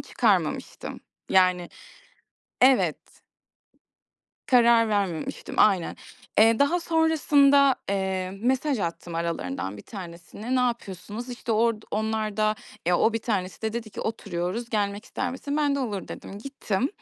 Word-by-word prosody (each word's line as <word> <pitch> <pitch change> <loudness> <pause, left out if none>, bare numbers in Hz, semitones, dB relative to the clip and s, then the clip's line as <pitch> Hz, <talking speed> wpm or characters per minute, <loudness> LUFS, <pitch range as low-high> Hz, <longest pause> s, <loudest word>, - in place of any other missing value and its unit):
çıkarmamıştım. - - -1 0.3
Yani 185 -2 +3 0.9
Evet. 260 0 +2 1.3
Karar 235 -3 +5
vermemiştim, 195 -6 -2
aynen. 190 -5 +3 0.4
Eee, 225 +1 +6
daha 330 +5 +3
sonrasında, 285 -4 +4
eee, 190 -1 -1
mesaj 265 +2 +1
attım 170 -2 -4
aralarından 100 - -3
1 100 - -10
tanesine. 190 +5 -7
Ne - - +3
yapıyorsunuz? 235 -1 -3
İşte, 240 -1 -4
orda 225 0 +1
onlar 220 -1 -1
da 215 0 +2 0.3
ya, 175 0 +3
o 225 - +3
1 225 - 0
tanesi 200 -4 -3
de 220 - -1
dedi 230 -1 -5
ki - - -7
"Oturuyoruz, 205 +1 -3
gelmek 205 0 -1
ister 250 -1 -3
misin?" 285 +3 -4
Ben 290 -2 +2
de 280 - -1
"Olur" 205 -7 -3
dedim. 200 - -8
Gittim. 255 -2 -2
220 Hz, 130 wpm, -26 LUFS, 190-250 Hz, 1.3 s, Eee